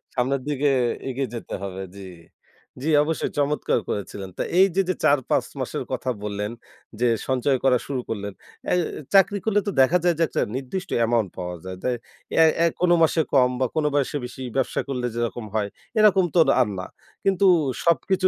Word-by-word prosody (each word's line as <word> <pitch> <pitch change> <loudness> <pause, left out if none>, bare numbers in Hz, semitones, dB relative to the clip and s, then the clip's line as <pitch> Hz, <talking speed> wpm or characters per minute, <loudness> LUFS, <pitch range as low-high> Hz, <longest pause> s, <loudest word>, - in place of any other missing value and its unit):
সামনের 130 +2 0
দিকে 145 0 +1 0.4
এগিয়ে 130 0 -2
যেতে 115 - -7
হবে 95 0 -5
জি, 95 -1 -9 0.7
জি, 155 - -1
অবশ্যই 160 +1 -2
চমৎকার 145 -3 +1
করেছিলেন। 100 -1 -4
তো - - -2 0.2
এইযে 195 0 +4
যে 185 - +1
৪-৫ 140 -3 +2
মাসের - - -3
কথা 130 - -2
বললেন 105 0 -3 0.5
যে 125 - +3 0.2
সঞ্চয় 130 +1 +1
করা 130 -2 +4
শুরু 135 -3 -2
করলেন। 100 -2 -4 0.4
এ - - +4 0.4
চাকরি 200 +1 +5
করলে 210 -1 +3
তো - - +1
দেখা 155 +7 +5
যায় 175 -1 +3
যে - - +4
একটা - - -1
নির্দিষ্ট 160 +9 -4
অ্যামাউন্ট 115 -3 +2
পাওয়া 90 -1 -4
যায়। 95 0 -7
দ্যা 125 - +1 0.4
অ্যা 165 - +6
অ্যা 170 0 +4
কোনো 175 -1 +4
মাসে 160 0 +3
কম 125 -2 +5
বা 130 - +2
কোনো 155 -1 +2
বয়সে 145 0 0
বেশি 125 +2 -9
ব্যবসা 135 - 0
করলে 125 -3 -2
যেরকম 120 -1 -2
হয়, 105 -2 0 0.3
এরকম 195 -3 +5
তো - - +5 0.2
আর 125 - +3
না। 95 - -5 0.4
কিন্তু 195 0 +3 0.4
সবকিছু 185 +2 +3
135 Hz, 175 wpm, -24 LUFS, 115-170 Hz, 0.7 s, অ্যা